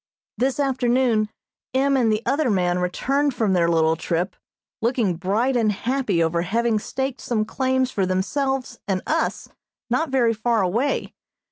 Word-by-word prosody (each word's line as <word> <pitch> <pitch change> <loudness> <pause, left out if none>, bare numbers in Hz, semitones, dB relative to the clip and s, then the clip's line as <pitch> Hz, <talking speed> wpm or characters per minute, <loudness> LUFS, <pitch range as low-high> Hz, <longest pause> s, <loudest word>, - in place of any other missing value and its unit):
This 255 +4 0
afternoon 250 -5 +2 0.5
M. 275 +1 +3
and 240 -4 +3
the 215 +1 0
other 275 +2 +1
man 180 -3 +1
returned 270 +10 0
from 215 -5 +1
their 170 -2 +3
little 160 -1 +3
trip, 170 +3 -2 0.5
looking 230 -6 +1
bright 210 +9 0
and 225 -3 +3
happy 225 -5 0
over 165 +1 0
having 225 +5 +1
staked 265 +4 -4
some 220 -3 -1
claims 260 +1 0
for 195 -5 0
themselves 265 +8 -1
and 190 -2 -1
us 320 +1 -1 0.4
not 310 +6 +1
very 245 -4 +2
far 225 -1 +1
away. 230 +10 -1
230 Hz, 150 wpm, -23 LUFS, 190-260 Hz, 0.5 s, M